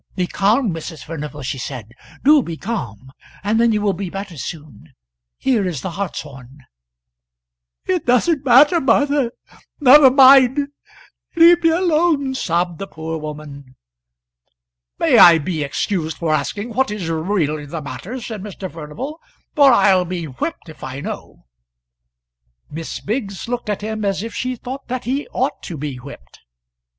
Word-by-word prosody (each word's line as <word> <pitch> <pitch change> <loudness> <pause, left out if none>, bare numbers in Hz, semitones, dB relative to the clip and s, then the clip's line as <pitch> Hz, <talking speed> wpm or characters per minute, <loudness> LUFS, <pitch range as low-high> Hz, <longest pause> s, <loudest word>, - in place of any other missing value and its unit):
"Be 180 - 0
calm, 210 +3 +1
Mrs. 160 -2 -7
Furnival," 150 -2 -7
she 130 +1 -4
said; 120 -4 -7 0.3
"do 295 +1 +6
be 170 -8 -6
calm, 130 - -6 0.3
and 215 +3 +1
then 235 -1 +4
you 210 -1 0
will 200 -2 +2
be 190 0 -5
better 195 -1 -7
soon. 150 -5 -9 0.4
Here 235 -8 +1
is 160 -8 -4
the 190 - -4
hartshorn." 140 -8 -7 1.2
"It 365 -6 -1
doesn't 275 +5 +2
matter, 285 +7 +5
Martha: 280 +1 +2 0.5
never 280 0 +8
mind: 270 +1 +6 0.7
leave 340 +1 +6
me 330 - +4
alone," 320 -5 +1
sobbed 175 -7 -1
the 195 - -5
poor 160 -2 -6
woman. 150 -3 -9 1.2
"May - - +4
I 170 -1 +9
be 160 0 -3
excused 160 +3 -2
for 160 -2 -1
asking 205 +10 -2
what 260 +1 +1
is 210 -5 -4
really 160 -3 -1
the 155 +1 -6
matter?" 145 - -7
said 220 -4 -7
Mr. 195 -2 -7
Furnival, 220 - -7 0.3
"for 285 -3 +6
I'll 190 -6 +4
be 175 -1 -4
whipped 175 - -5
if 155 -2 -13
I 130 +1 -6
know." - - -8 1.3
Miss 160 +2 -6
Biggs 205 -3 -4
looked 245 -2 -4
at 210 - -2
him 215 0 -4
as 195 0 -1
if 225 - -6
she 255 0 -3
thought 260 +3 -8
that 250 0 -4
he 270 +4 -2
ought - - -2
to 165 - -7
be 140 -2 -5
whipped. 120 - -13
195 Hz, 155 wpm, -19 LUFS, 155-255 Hz, 1.3 s, I